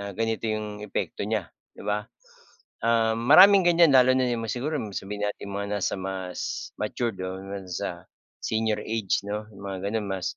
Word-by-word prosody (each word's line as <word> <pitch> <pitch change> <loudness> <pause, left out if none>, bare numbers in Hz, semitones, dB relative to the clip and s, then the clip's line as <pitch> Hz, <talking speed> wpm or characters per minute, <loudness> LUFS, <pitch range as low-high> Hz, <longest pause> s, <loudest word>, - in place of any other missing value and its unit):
na 100 0 -5
ganito 115 0 -1
'yong 105 -1 -3
epekto - - -3
niya - - -1 0.3
'di - - -10
ba? 105 +1 -1 1.1
Maraming 185 +10 +8
ganyan 170 -2 +6
lalo 130 0 +7
na 130 - +3 0.2
siguro 145 +7 -2 0.2
sabihin 105 +2 -3
natin 100 -1 -6
mga 100 +1 -3
nasa - - 0
mas 95 -1 -4
matured 110 -1 -2
o 95 0 -3 0.4
sa 90 - -5 0.4
Senior 110 -1 0
age, 110 -3 -1
'no? 105 +1 -4
Mga 100 -1 -5
gano'n 110 -2 -2
mas 95 -2 -3
105 Hz, 150 wpm, -26 LUFS, 100-115 Hz, 1.1 s, Maraming